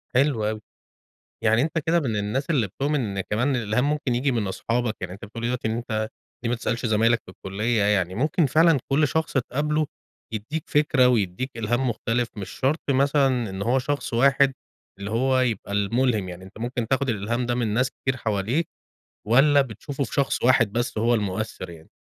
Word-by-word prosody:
حلو 130 -4 +2
أوي، 110 0 -4 0.8
يعني 110 +1 +4
أنت 160 +3 -1
كده 170 +1 +4
من 125 -9 -2
الناس 105 +9 -2
اللي 130 -10 +2
بتؤمن 140 +9 -1
أن 100 -4 -2
كمان 125 +8 0
الإلهام 120 +4 0
ممكن 145 -5 0
ييجي 135 +3 +1
من 115 -5 -1
أصحابك، 115 +3 -1
يعني - - -4
أنت 100 +4 -9
بتقول 115 +3 -8
لي - - +1
دلوقتي 125 -2 -2
إن 110 - -1
أنت 110 -2 -2 0.3
ليه 115 - 0
ما 120 - +1
تسألش 120 +1 -2
زمايلك 115 +1 +3
في - - -11
الكلية، 105 +5 -1
يعني 95 -3 +1
ممكن 150 - +2
فعلًا 160 +2 +4
كل 150 +2 +3
شخص 160 +4 -1
تقابله 150 +4 0 0.5
يديك 130 +9 -4
فكرة، 145 -4 +4
ويديك 115 +1 0
إلهام 120 +3 0
مختلف، 115 +1 -1
مش 100 - -5
شرط 140 +5 0
مثلًا 135 -3 +2
إن 95 0 -6
هو 120 +6 +2
شخص 140 0 -3
واحد 135 +2 +4 0.5
اللي 100 +1 -5
هو 130 +3 +2
يبقى 115 -6 -1
المُلهم، 105 0 +1
يعني 90 +1 -9
أنت 95 +3 -13
ممكن 120 0 -3
تاخد 135 +2 +1
الإلهام 115 +3 -1
ده 120 0 0
من 120 -2 0
ناس 130 +4 +1
كتير 135 -1 -3
حواليك 115 - -1 0.6
والّا 140 +6 +5
بتشوفه 135 +3 -5
في - - -9
شخص 140 -1 0
واحد 120 -4 +4
بس 120 -1 -1
هو 115 +2 +3
المؤثر 100 -3 -3
يعني؟ 80 -1 -13
120 Hz, 190 wpm, -24 LUFS, 110-135 Hz, 0.8 s, والّا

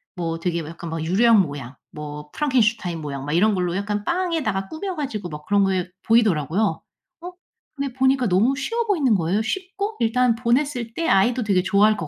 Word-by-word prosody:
뭐 165 -2 -3
되게 170 0 -1
뭐 155 0 -7
약간 170 0 -8
유령 215 +5 +5
모양, 140 -5 -7 0.2
뭐 150 0 -8
프랑켄슈타인 230 - +1
모양, 140 -3 -5
막 145 - -3
이런 210 +6 +3
걸로 180 -2 -1
약간 205 +1 -2
빵에다가 320 - -1
꾸며 365 - -5
가지고 220 - -4
막 150 -1 -8
그런 205 -1 +3
게 185 -2 -1
보이더라고요. 195 - +2 0.4
어? 355 +1 -7 0.4
근데 280 -2 -3
보니까 260 -1 +2
너무 210 +8 +3
쉬워 460 - -2
보이는 300 - +2
거예요. 185 +3 0
쉽고, 385 - -3
일단 240 +1 +2
보냈을 245 0 0
때 330 - -1
아이도 240 +1 +3
되게 195 -4 +2
좋아할 205 +3 +4
것 160 - -4
210 Hz, 390 characters per minute, -22 LUFS, 175-260 Hz, 0.4 s, 유령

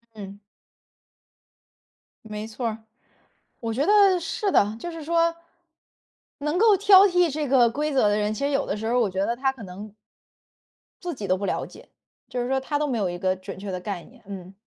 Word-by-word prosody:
嗯。 200 -1 -9 1.9
没 215 0 -6
错 230 +2 -4
儿， 220 -1 -3 0.8
我 225 -1 -3
觉 275 +4 +1
得 400 -3 +5
是 400 +4 -2
的。 210 +2 +3
就 345 - -6
是 330 -1 -8
说， 335 +1 +2 1.0
能 300 +4 -1
够 435 -1 +6
挑 395 0 +7
剔 355 -3 +3
这 295 -2 -2
个 245 -3 +5
规 300 +4 -2
则 260 -6 +3
的 205 - +2
人， 210 0 0
其 280 - -3
实 285 - +1
有 275 - 0
的 - - -2
时 220 +1 -5
候 245 +2 +2
我 220 - +2
觉 190 +1 -1
得 235 - 0
他 265 +1 +1
可 260 -4 -12
能 200 +3 -9 1.1
自 350 -3 -4
己 210 -6 -6
都 185 - +3
不 200 +1 -4
了 - - -1
解， - - -15 0.4
就 250 - -3
是 245 - -3
说 265 0 +1
他 290 +2 -2
都 295 0 -1
没 240 -5 -1
有 190 -3 0
一 175 - -5
个 185 +1 0
准 190 +1 -9
确 195 0 -6
的 185 - -3
概 180 -2 -5
念， 240 -2 -19
嗯。 190 -2 -8
240 Hz, 225 characters per minute, -24 LUFS, 205-305 Hz, 1.9 s, 挑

